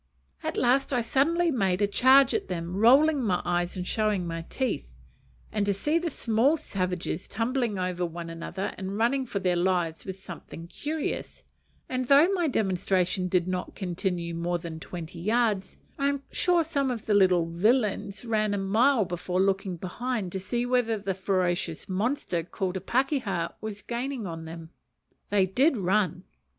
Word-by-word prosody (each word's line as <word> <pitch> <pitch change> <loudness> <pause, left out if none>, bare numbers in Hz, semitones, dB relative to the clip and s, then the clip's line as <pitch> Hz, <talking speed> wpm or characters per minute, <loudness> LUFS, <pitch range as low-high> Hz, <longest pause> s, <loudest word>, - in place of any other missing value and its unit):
At - - -3
last 260 +3 +2
I 250 -3 +2
suddenly 325 +9 +2
made 195 -8 +1
a 205 - +4
charge 260 +6 +5
at - - -1
them, 175 -1 -4
rolling 275 +8 +5
my 185 -5 +1
eyes 175 +1 0
and 180 - -3
showing 210 -3 0
my 165 -1 -4
teeth; 255 - -2 0.6
and 210 - 0
to 200 - +2
see 300 - +1
the 340 0 -2
small 255 +3 +2
savages 185 - -3
tumbling 230 -1 -1
over 180 -1 -1
one 170 0 -4
another 165 +4 -4
and 195 +1 -4
running 255 +4 +1
for 210 - -3
their 180 -2 +1
lives 175 -2 0
was 190 -1 -6
something 170 -2 -9
curious: 295 - -4 0.4
and 255 0 -2
though 285 +5 +7
my 360 -4 +1
"demonstration" 185 - +1
did 180 -1 +1
not 185 -1 -3
continue 180 -2 -2
more 170 +1 -1
than 165 -1 -7
twenty 170 0 -7
yards, 215 0 0 0.2
I 280 0 +2
am 280 -1 -2
sure 350 -2 +3
some 280 -4 0
of 235 -4 -4
the 215 - +1
little 185 -4 +4
villains 205 +3 0
ran 215 -2 +1
a - - -1
mile 220 +5 +3
before 180 +1 -2
looking 195 -1 +1
behind 205 +2 -3
to 190 - -3
see 240 +6 -2
whether 245 -3 +1
the 195 -1 -2
ferocious 180 -3 -1
monster 200 - -1
called 185 +2 -3
a 190 - -3
pakeha 235 - 0
was 210 -1 -6
gaining 245 0 -3
on 165 -2 -6
them. 165 0 -9 0.6
They 200 -2 +3
did 260 - +2
run! 185 -2 +1
200 Hz, 170 wpm, -27 LUFS, 180-245 Hz, 0.6 s, though